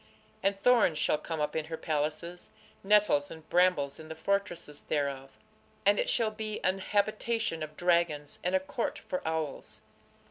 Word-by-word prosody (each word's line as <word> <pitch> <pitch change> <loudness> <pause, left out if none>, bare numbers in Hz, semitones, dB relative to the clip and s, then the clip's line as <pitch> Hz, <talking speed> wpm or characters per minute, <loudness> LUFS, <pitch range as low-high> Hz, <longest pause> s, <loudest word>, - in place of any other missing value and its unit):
And 195 0 +1
thorns 230 -9 +4
shall 150 - +2
come 160 0 -4
up 150 - -1
in 160 -1 -1
her 160 0 -5
palaces, 155 +3 -3 0.3
nettles 200 -8 +4
and 160 -1 -11
brambles 175 -6 +3
in 160 0 -10
the 160 - -6
fortresses 175 -4 -2
thereof: 140 -2 -2 0.5
and - - +5
it - - +1
shall 225 - +2
be 215 0 -4
an 185 +1 +1
habitation 210 -2 0
of 155 0 -6
dragons, 170 -4 +1
and 180 +1 +1
a - - +4
court 190 - -3
for 180 - -4
owls. 160 -3 -3
170 Hz, 165 wpm, -30 LUFS, 155-200 Hz, 0.5 s, and